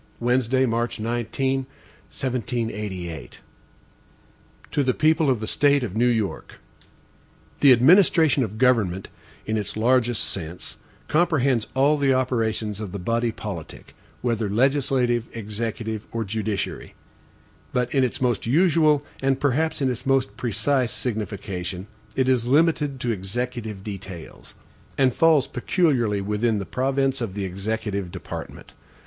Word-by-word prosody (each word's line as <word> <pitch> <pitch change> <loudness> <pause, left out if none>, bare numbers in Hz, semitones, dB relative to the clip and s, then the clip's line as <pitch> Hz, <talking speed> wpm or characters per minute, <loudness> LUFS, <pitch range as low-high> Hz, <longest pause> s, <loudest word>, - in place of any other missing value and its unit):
Wednesday, 125 +2 +2
March 120 -1 -1
19, 120 +4 -1 0.5
1788. 110 -7 -3
HAMILTON - - -15 1.3
To 145 - +1
the 130 -2 +1
People 155 -1 +3
of 125 -4 +2
the 110 - -4
State 145 +3 +3
of 105 -5 -4
New 120 +2 +3
York: 110 -5 -1 1.0
THE 140 - +7
administration 160 - +5
of 110 -1 -5
government, 110 -7 +2 0.4
in 110 0 -1
its 105 0 -4
largest 120 0 +2
sense, 85 -1 -6 0.3
comprehends 140 -8 +2
all 140 +3 +4
the 135 -2 +3
operations 110 -5 -1
of 105 -4 -6
the - - -3
body 115 +5 0
politic, 100 -8 -8 0.3
whether 115 -4 0
legislative, 125 0 +1
executive, 110 0 -4
or 115 -1 -2
judiciary; 105 -1 -3 0.8
but 125 -1 -1
in 135 -2 +3
its 125 - -1
most 120 -4 0
usual, 155 0 +3 0.2
and 135 0 +1
perhaps 145 +2 0
its 125 -1 -2
most 135 -7 +1
precise 120 +3 0
signification. 100 -5 -4 0.3
it 130 -1 +1
is 125 -3 +2
limited 150 -1 +2
to 120 - 0
executive 110 +1 -4
details, 95 -5 -9 0.4
and 130 -2 +3
falls 160 -4 +4
peculiarly 125 - +1
within 105 +3 0
the 100 - -3
province 135 +2 0
of 105 -5 -3
the 100 -2 -2
executive 100 0 -3
department. - - -8
120 Hz, 130 wpm, -24 LUFS, 105-135 Hz, 1.3 s, THE